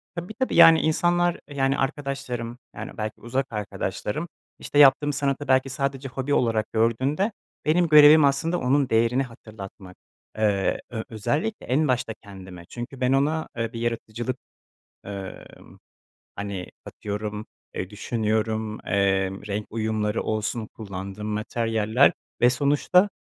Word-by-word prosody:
Tabii, 175 +5 -5
tabii. 260 - 0
Yani, 165 -1 +9
insanlar, 175 +2 +2
yani, 135 -1 +1
arkadaşlarım, 135 -4 -3 0.2
yani, - - -7
belki 110 0 -4
uzak 130 +3 -1
arkadaşlarım, 105 - -3 0.3
işte, 145 - 0
yaptığım 145 +1 +6
sanatı 140 0 -1
belki 130 0 +3
sadece 135 0 -3
hobi 135 +3 -2
olarak 115 -3 +1
gördüğünde 130 - +1 0.3
benim 170 +3 +3
görevim 150 0 +8
aslında 165 +5 +1
onun 135 +1 +2
değerini 115 +4 +3
hatırlatmak. 105 -6 -11 0.4
Eee, 100 -3 +1
ö 110 -2 -4
özellikle 145 - -2
en 145 +5 +2
başta 125 -3 0
kendime 95 -3 -11
çünkü 125 +2 -7
ben 125 +1 +3
ona, 150 +4 +1
eee, 115 +1 -2
bir 115 - -5
yaratıcılık, 120 +1 -3 0.7
ımm, 100 -1 -9 0.6
hani, 100 -3 -4 0.2
atıyorum, 105 +1 -5 0.3
eee, 95 - -4
düşünüyorum, 110 0 -1
eee, 95 -1 +2 0.2
renk 105 +1 -3
uyumları 110 -1 -1
olsun, 110 +1 -2
kullandığım 100 0 -6
materyaller 110 +2 +2 0.3
ve 120 - +6
sonuçta 145 +9 +3
120 Hz, 125 wpm, -25 LUFS, 105-140 Hz, 0.7 s, Yani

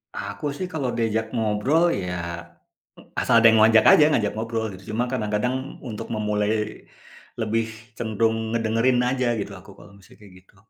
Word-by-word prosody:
Aku - - -6
sih 185 - -3
kalau 140 -5 -2
diajak 110 -1 0
ngobrol 115 +8 +1 0.2
ya, 90 0 -4 1.1
asal - - +1
ada 115 0 +7
yang 110 - +4
ngajak 110 0 +6
aja, 150 - +7
ngajak 110 -8 +1
ngobrol 115 0 -3
gitu, 95 +1 -12
cuma 115 +3 0
kadang-kadang 110 0 -1 0.3
untuk 105 - -6
memulai 105 -1 0 0.9
lebih 115 +1 0 0.3
cenderung 110 0 0 0.2
ngedengerin 115 +2 +1
aja 130 0 -1
gitu, 100 0 -5
aku 95 - -17
kalau - - -15
misalnya 100 +2 -20
kaya 100 -2 -15
gitu. 95 +2 -28
110 Hz, 155 wpm, -23 LUFS, 105-115 Hz, 1.1 s, ada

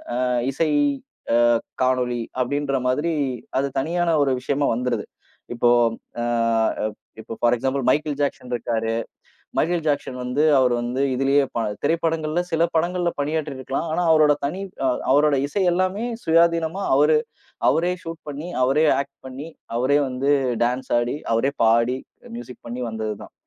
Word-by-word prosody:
அ - - -1 0.3
இசை 160 +3 0 0.9
அ - - -9 0.2
காணொளி 125 -2 +1 0.2
அப்டின்ற 140 +1 -1
மாதிரி 150 +6 0 0.5
அது 140 - +1
தனியான 170 +4 0
ஒரு 140 - +2
விஷயமா 140 +1 0
வந்துருது. 125 +1 -1 0.5
இப்போ 120 0 +3 0.5
அ - - -1 1.0
இப்போ 110 - -9
பார் 120 0 +4
எக்சாம்பில் 135 +1 -1
மைகேல் 150 +2 +1
ஜாக்சன் 135 -3 -2
இருக்காரு. 115 -1 -1 0.7
மைகேல் 170 +1 +1
ஜாக்சன் 140 -3 -1
வந்து 125 +4 0 0.2
அவரு 125 -1 +3
வந்து 120 +3 -2
இதிலேயே 135 +2 +3
ப 115 - 0 0.2
திரைப்படங்கள்ல 160 +1 0
சில 165 +1 +3
படங்களில்ல 175 +1 +1
பணியாற்றி 150 0 -1
இருக்கலாம். 135 +5 -3
ஆனா 175 - +1
அவரோட 155 -2 +5
தனி 180 +7 -3 0.2
அ - - +3 0.3
அவரோட 145 0 +4
இசை 190 +7 -1
எல்லாமே 185 +4 0 0.2
சுயாதீனமா 165 +2 +2
அவரு 150 +2 +5 0.5
அவரே 175 +3 +1
சூட் 165 0 -7
பண்ணி, 150 +4 -6
அவரே 140 +5 +3
ஆக்ட் 140 0 -5
பண்ணி, 135 +4 -7 0.3
அவரே 135 +4 +3
வந்து 135 +3 0 0.3
டான்ஸ் 125 +2 -2
ஆடி, 120 +3 -1 0.2
அவரே 125 +5 +2
பாடி, 115 +3 +3 0.4
மியூசிக் 120 0 -10
பண்ணி 125 +2 -4
வந்தது 110 -1 -3
தான். - - -14
140 Hz, 145 wpm, -23 LUFS, 125-160 Hz, 1.0 s, அவரோட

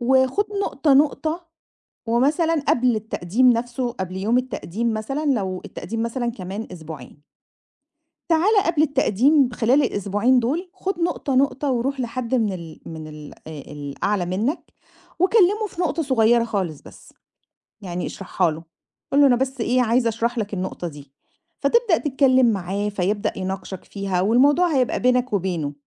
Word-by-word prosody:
وخُد 260 +9 +3 0.2
نقطة، 285 -5 +1
نقطة، 310 +4 +1 0.6
ومثلًا 290 +8 +2
قبل 245 -1 +3
التقديم 220 +3 +1
نَفْسه 240 +1 -2
قبل 190 -5 -5
يوم 220 +6 +1
التقديم 235 -3 -2
مثلًا، 270 +8 -3
لو 195 -10 0
التقديم 225 +3 -5
مثلًا 235 0 -2
كمان 200 +1 -6
أسبوعين. 160 -3 -10 1.0
تعالَ 355 +7 +3
قبل 320 -3 +2
التقديم 275 -1 +3
خلال 255 +5 +3
الأسبوعين 205 +2 +1
دُول 325 +10 -2
خُد 380 -2 -4
نقطة، 335 -5 -1
نقطة 275 +1 +1
ورُوح 260 +2 -1
لحد 245 0 -3
من 220 -5 +1
ال 170 -4 -9
من 160 -1 -7
ال 150 -1 -10
آآ 160 - -7 0.2
الأعلى 160 +7 -2
منك 215 - -2 0.5
وكلّمه 410 +2 +3
في 350 - -8
نقطة 330 -2 0
صغيرة 240 -4 +3
خالص 190 - -3
بس، - - -15 0.7
يعني 180 -2 -4
اشرحها 185 -2 -1
له، 160 +2 -8 0.5
قُل 280 - +4
له 285 - +7
أنا 245 -3 +4
بس 265 0 -2
إيه 250 +2 +2
عايز 235 +1 +2
أشرح 235 +2 -1
لك 210 -2 -3
النقطة 185 -1 -4
دي، 145 -3 -13 0.5
فتبدأ 410 - +3
تتكلم 265 -3 +3
معاه 200 +1 -2
فيبدأ 205 +2 -1
يناقشك 190 0 -5
فيها 195 -3 -2
والموضوع 285 - +3
هيبقى 255 -2 +1
بينك 250 0 +2
وبينه، 175 -7 -1
235 Hz, 145 wpm, -22 LUFS, 190-275 Hz, 1.0 s, له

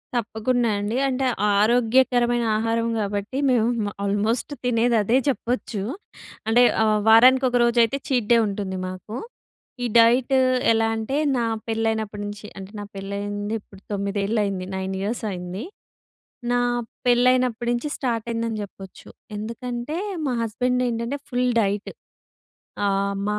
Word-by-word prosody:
తప్పకుండా 235 +1 0
అండి. 210 +4 -2
అంటే 265 0 -1 0.3
ఆరోగ్యకరమైన 240 +2 +3
ఆహారం 230 +1 0
కాబట్టి 205 +4 -3
మేము 230 -3 +1
ఆల్మోస్ట్ 210 +7 0
తినేది 240 0 +2
అదే 235 +5 +3
చెప్పొచ్చు 245 -5 -1 0.7
అంటే 235 +2 +5 0.2
ఆహ్, 215 -1 +3
వారానికి 255 +4 +7
ఒకరోజైతే 240 0 +3
చీట్ 245 -7 0
డే 235 - +7
ఉంటుంది 195 -2 -4
మాకు. 185 +4 -7 0.7
ఈ - - 0
డైట్ 240 +3 +5 0.4
ఎలా 225 0 +3
అంటే 225 +5 -2 0.2
నా 240 - +1 0.2
పెళ్ళైనప్పటి 220 -2 -1
నుంచి 205 +1 -7
అంటే 190 0 -9
నా - - -5
పెళ్లయింది 205 +1 -4
ఇప్పుడు 195 -1 -17
9 200 +2 -1
అయింది 195 -2 -2
9 190 0 -3
ఇయర్స్ 220 +4 -3
అయింది. 180 +3 -5 0.9
నా 245 0 +2 0.5
పెళ్ళైనప్పటి 245 -1 +3
నుంచి 240 +5 -2
స్టార్ట్ 235 -4 -2
అయిందని 230 -1 -2
చెప్పొచ్చు. 195 -1 -12 0.3
ఎందుకంటే 240 +6 -4 0.3
మా 265 - 0
హస్బెండ్ 250 +3 0
ఏంటంటే 235 +3 -2
ఫుల్ 250 -1 +1
డైట్. 200 0 -1 1.0
ఆహ్, 200 0 0
మా 210 0 0
225 Hz, 125 wpm, -23 LUFS, 205-245 Hz, 1.0 s, వారానికి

